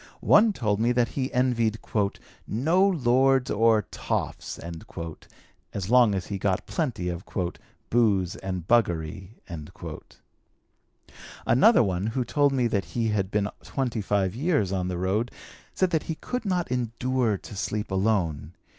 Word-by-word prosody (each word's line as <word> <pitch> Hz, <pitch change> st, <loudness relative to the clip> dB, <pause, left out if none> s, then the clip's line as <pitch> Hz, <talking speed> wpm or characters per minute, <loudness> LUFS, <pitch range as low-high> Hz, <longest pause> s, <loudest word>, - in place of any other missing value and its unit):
One 215 Hz, +1 st, +6 dB
told 105 Hz, -, -1 dB
me 115 Hz, +2 st, +2 dB
that 120 Hz, -1 st, +2 dB
he 130 Hz, -1 st, -3 dB
envied 120 Hz, -3 st, +1 dB, 0.7 s
'no 165 Hz, -, +3 dB
lords 135 Hz, -5 st, +3 dB
or 110 Hz, 0 st, +4 dB
toffs' -, -, -3 dB
as 85 Hz, +3 st, -9 dB
long 120 Hz, -5 st, +6 dB
as 95 Hz, -, -3 dB
he 100 Hz, -2 st, -4 dB
got 95 Hz, -1 st, 0 dB
plenty 125 Hz, -, -2 dB
of 85 Hz, 0 st, -4 dB, 0.7 s
'booze 105 Hz, -7 st, +2 dB
and 90 Hz, -3 st, -5 dB
buggery.' 95 Hz, -3 st, 0 dB, 2.1 s
"Another 135 Hz, -, +6 dB
one, 95 Hz, 0 st, -1 dB
who 120 Hz, +2 st, -1 dB
told 145 Hz, +1 st, +2 dB
me 130 Hz, -3 st, +1 dB
that 100 Hz, -5 st, 0 dB
he 115 Hz, -1 st, +1 dB
had 100 Hz, -3 st, 0 dB
been 105 Hz, 0 st, 0 dB
twenty 125 Hz, -5 st, -2 dB
five 100 Hz, -2 st, 0 dB
years 135 Hz, -, +1 dB
on 90 Hz, -2 st, -1 dB
the 90 Hz, -1 st, -3 dB
road, 100 Hz, +6 st, 0 dB, 0.5 s
said 185 Hz, -1 st, +2 dB
that 160 Hz, -3 st, +2 dB
he 160 Hz, -, -1 dB
could 250 Hz, +7 st, -4 dB
not 180 Hz, -7 st, -1 dB
endure 125 Hz, -2 st, 0 dB
to 105 Hz, -, -11 dB
sleep 105 Hz, +1 st, -3 dB
alone. 95 Hz, -6 st, 0 dB
110 Hz, 140 wpm, -26 LUFS, 95-130 Hz, 2.1 s, One